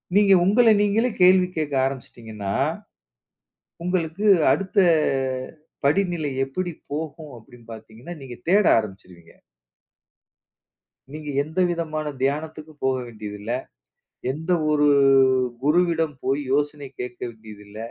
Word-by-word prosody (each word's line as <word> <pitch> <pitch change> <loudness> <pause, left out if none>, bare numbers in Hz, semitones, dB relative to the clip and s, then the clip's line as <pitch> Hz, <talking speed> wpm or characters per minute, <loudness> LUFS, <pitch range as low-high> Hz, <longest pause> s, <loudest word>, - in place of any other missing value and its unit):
நீங்க 200 -1 +5
உங்கள 225 +5 +4
நீங்களே 220 +4 +2
கேள்வி 185 0 +6
கேக்க 150 -3 -2
ஆரம்பிச்சிட்டீங்கன்னா, 110 -6 -6 1.3
உங்களுக்கு 180 +2 -2 0.3
அடுத்த 195 +1 -3 1.1
படிநிலை 165 -1 +1
எப்படி 175 +6 -4 0.2
போகும் 155 -1 -6
அப்படினு 120 +1 -18
பார்த்தீங்கன்னா, 115 +9 -10
நீங்க 125 -2 -8
தேட 200 +3 +4
ஆரம்பிச்சுருவீங்க. 95 -5 -8 1.8
நீங்க 155 -1 -7
எந்தவிதமான 165 -2 -2 0.2
தியானத்துக்கும் 155 +2 -3
போக 130 0 +2
வேண்டியதுல்ல. 105 -1 -7 0.8
எந்த 160 +5 -4 0.2
ஒரு 150 -1 +3 0.8
குருவிடம் 160 0 +1
போய் 135 +2 0
யோசனை 145 0 -1
கேட்க 125 0 -7
வேண்டியதில்ல. 105 -2 -13
150 Hz, 95 wpm, -23 LUFS, 120-175 Hz, 1.8 s, கேள்வி